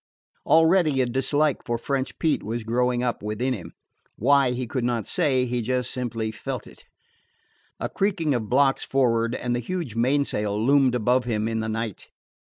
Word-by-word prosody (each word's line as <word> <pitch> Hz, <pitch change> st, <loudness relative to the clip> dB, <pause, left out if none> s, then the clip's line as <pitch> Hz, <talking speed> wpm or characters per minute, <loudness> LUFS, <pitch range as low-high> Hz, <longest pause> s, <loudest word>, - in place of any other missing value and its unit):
Already 160 Hz, -3 st, +4 dB
a -, -, +2 dB
dislike 135 Hz, +4 st, 0 dB
for 120 Hz, -1 st, -2 dB
French 135 Hz, +2 st, -3 dB
Pete 160 Hz, -2 st, +1 dB
was 115 Hz, +2 st, -4 dB
growing 125 Hz, +2 st, 0 dB
up 120 Hz, -2 st, -1 dB
within 110 Hz, +5 st, -1 dB
him. 100 Hz, -8 st, -7 dB, 0.4 s
Why, 140 Hz, -2 st, +3 dB
he 125 Hz, +1 st, -2 dB
could 125 Hz, +2 st, -3 dB
not 120 Hz, -3 st, -1 dB
say; 140 Hz, -8 st, +1 dB
he 120 Hz, 0 st, -1 dB
just 125 Hz, +2 st, -1 dB
simply 115 Hz, -3 st, -3 dB
felt 110 Hz, -, -5 dB
it. -, -, -16 dB, 0.9 s
A -, -, -2 dB
creaking 180 Hz, -7 st, 0 dB
of 110 Hz, -4 st, -2 dB
blocks 135 Hz, +1 st, +3 dB
for'ard, 115 Hz, -3 st, +1 dB
and 120 Hz, 0 st, -2 dB
the -, -, -1 dB
huge 165 Hz, 0 st, -4 dB
mainsail 115 Hz, -4 st, 0 dB
loomed 130 Hz, +1 st, +3 dB
above 125 Hz, +2 st, +2 dB
him 110 Hz, -2 st, -1 dB
in 115 Hz, 0 st, -1 dB
the 110 Hz, 0 st, -2 dB
night. 110 Hz, -1 st, -4 dB
125 Hz, 170 wpm, -24 LUFS, 115-135 Hz, 0.9 s, Already